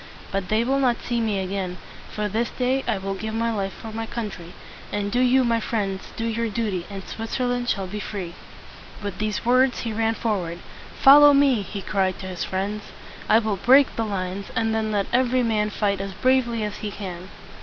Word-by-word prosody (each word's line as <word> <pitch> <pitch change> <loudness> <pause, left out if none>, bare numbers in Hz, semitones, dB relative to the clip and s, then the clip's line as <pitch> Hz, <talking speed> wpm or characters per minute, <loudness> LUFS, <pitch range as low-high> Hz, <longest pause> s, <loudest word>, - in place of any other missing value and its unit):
But 195 -2 -2
they 220 +2 +2
will 270 +3 +1
not 250 -3 +1
see 240 -1 -1
me 215 -3 0
again, 190 -1 -3 0.3
for 210 -1 -2
this 225 +4 -1
day 260 +1 0
I - - +1
will 195 +1 -3
give 220 +3 -4
my 230 +1 0
life 195 -3 -2
for 225 - -9
my 225 +1 -4
country. 200 -8 -6 0.4
And 205 0 -2
do 245 - +1
you, 255 +1 +4
my 230 -1 +2
friends, 200 -4 -3
do 230 - -2
your 230 0 -1
duty, 205 -5 -2
and 195 -1 -7
Switzerland 245 +3 -2
shall 195 -2 0
be 205 +3 -5
free." 190 -5 -5 0.7
With 200 -2 -5
these 215 +1 -2
words 255 +1 +3
he 230 -2 -3
ran 225 +1 +1
forward. 190 -7 -2 0.4
"Follow 290 +1 +9
me!" 275 -5 +4
he 200 0 -6
cried 190 -2 0
to 190 - -8
his 185 -2 -4
friends. 200 +3 -3 0.4
"I 220 - +7
will 220 -3 0
break 265 +7 +5
the 225 - 0
lines, 195 -2 -3
and 225 -1 +1
then 220 -1 0
let 200 -2 +1
every 255 0 +3
man 215 -2 +1
fight 200 -2 0
as 195 0 -5
bravely 255 -3 +2
as 210 -1 -4
he 210 - -4
can." 190 -3 -7
215 Hz, 205 wpm, -24 LUFS, 195-235 Hz, 0.7 s, Follow